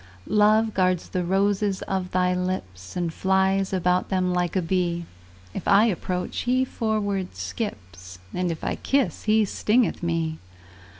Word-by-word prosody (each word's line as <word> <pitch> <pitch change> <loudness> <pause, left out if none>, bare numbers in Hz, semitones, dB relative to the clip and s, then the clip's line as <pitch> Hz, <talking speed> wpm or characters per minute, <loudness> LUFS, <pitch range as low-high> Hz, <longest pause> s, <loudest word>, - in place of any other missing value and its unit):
Love 215 +1 +3
guards 185 -2 +1
the 180 -1 -1
roses 195 +2 +1
of 190 -1 -2
thy 180 0 +1
lips, 180 - -4
And 170 -2 -1
flies 190 +1 +1
about 180 -1 +1
them 185 -1 +1
like 180 0 0
a 190 - +2
bee: 170 -1 0 0.5
If - - -5
I 200 +3 +6
approach, 180 -3 -2
he 255 +1 +1
forward 205 -6 -2
skips, 90 - -6 0.2
And 180 0 -1
if 160 - -6
I - - -2
kiss, 265 - 0
he 215 0 +4
stingeth 220 +4 +1
me. 165 -2 -1
185 Hz, 145 wpm, -25 LUFS, 175-205 Hz, 0.5 s, I